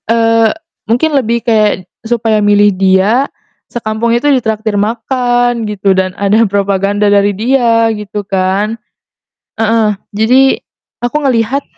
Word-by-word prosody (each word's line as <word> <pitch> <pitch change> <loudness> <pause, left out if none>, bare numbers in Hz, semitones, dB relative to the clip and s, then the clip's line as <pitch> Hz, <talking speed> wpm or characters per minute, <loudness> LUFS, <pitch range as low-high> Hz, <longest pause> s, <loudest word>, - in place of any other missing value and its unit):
Eee, 230 -1 +3 0.4
mungkin 270 +7 +1
lebih 235 -4 0
kayak 215 -5 +1 0.2
supaya 225 -2 0
milih 205 0 +3
dia, 195 +8 +2 0.4
sekampung 225 0 -2
itu 240 - -2
ditraktir 220 -4 -1
makan 245 +2 0
gitu 200 -1 0
dan 185 -1 -2
ada 205 +3 +2
propaganda 200 +1 0
dari 205 0 +3
dia 230 -1 +2
gitu 210 -1 -6
kan. 195 +3 -1 0.8
Heeh. 225 0 +1 0.2
Jadi 225 +6 +3 0.6
aku 245 +4 -1
ngelihat 255 +1 0
220 Hz, 115 wpm, -12 LUFS, 205-235 Hz, 0.8 s, Eee